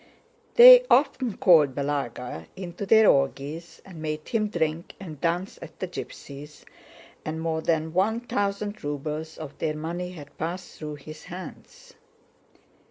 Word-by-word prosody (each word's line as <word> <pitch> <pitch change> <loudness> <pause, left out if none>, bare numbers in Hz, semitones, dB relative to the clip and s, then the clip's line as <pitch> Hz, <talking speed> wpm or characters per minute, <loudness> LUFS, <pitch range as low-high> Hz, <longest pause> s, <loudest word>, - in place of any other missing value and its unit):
They - - +11
often 260 -5 +2
called 150 -7 +5
Balagá 125 - -3
into 185 +1 -6
their 220 +1 +6
orgies 140 +4 0
and 175 -5 -11
made 155 0 -4
him 215 -2 +1
drink 165 -3 -2
and 160 -7 -9
dance 175 +3 -1
at 160 +1 -11
the 185 - -3
gypsies', 150 -4 -9 0.6
and 155 +1 -4
more 160 -1 -2
than 160 -1 0
one 215 +6 +1
thousand 205 -2 -3
rubles 150 +2 -4
of 150 -2 -8
their 155 -1 -1
money 175 +4 -5
had 145 -4 -13
passed 175 +3 -5
through 150 -1 -6
his 155 +2 -11
hands. 185 - -11
160 Hz, 140 wpm, -26 LUFS, 150-190 Hz, 0.6 s, They